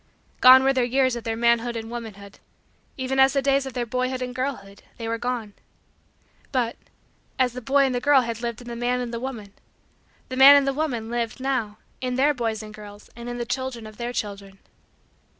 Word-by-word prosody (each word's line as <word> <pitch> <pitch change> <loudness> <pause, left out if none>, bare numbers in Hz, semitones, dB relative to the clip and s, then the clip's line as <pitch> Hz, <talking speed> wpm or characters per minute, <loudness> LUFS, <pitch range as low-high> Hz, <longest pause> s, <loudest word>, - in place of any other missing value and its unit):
Gone 260 +1 +8
were 270 0 +3
the 255 -2 +1
years 255 0 +2
of 235 - -7
their 225 -1 -1
manhood 235 0 +2
and 225 0 -6
womanhood 205 -4 -9 0.6
even 265 0 -2
as 265 0 +6
the 275 - +1
days 275 0 +2
of 265 - -7
their 245 -1 -2
boyhood 255 +2 -2
and 250 0 -5
girlhood 250 -7 -5 0.2
they 230 - -5
were 230 0 -2
gone. 240 -4 -3 1.0
But, 245 -4 0 0.6
as 255 -2 +1
the 250 - -6
boy 275 +3 +3
and 260 - -1
the 245 - -1
girl 280 0 +5
had 230 -1 -5
lived 235 -1 -4
in - - -14
the 235 - -5
man 245 +1 -1
and 240 -1 -4
the 235 - -3
woman, 230 -6 -7 0.8
the 255 - -4
man 275 +2 +10
and 280 -1 +4
the 275 - +1
woman 250 -7 -3
lived, 235 +1 -2
now, 255 -6 -2 0.2
in 250 -1 -2
their 285 +3 +3
boys 225 -4 -3
and 215 0 -10
girls 205 -1 -12
and 235 +1 -8
in 240 - -5
the 240 - -3
children 255 -2 -4
of 215 -1 -11
their 240 0 -4
children. 200 -4 -5
245 Hz, 215 wpm, -24 LUFS, 225-260 Hz, 1.0 s, man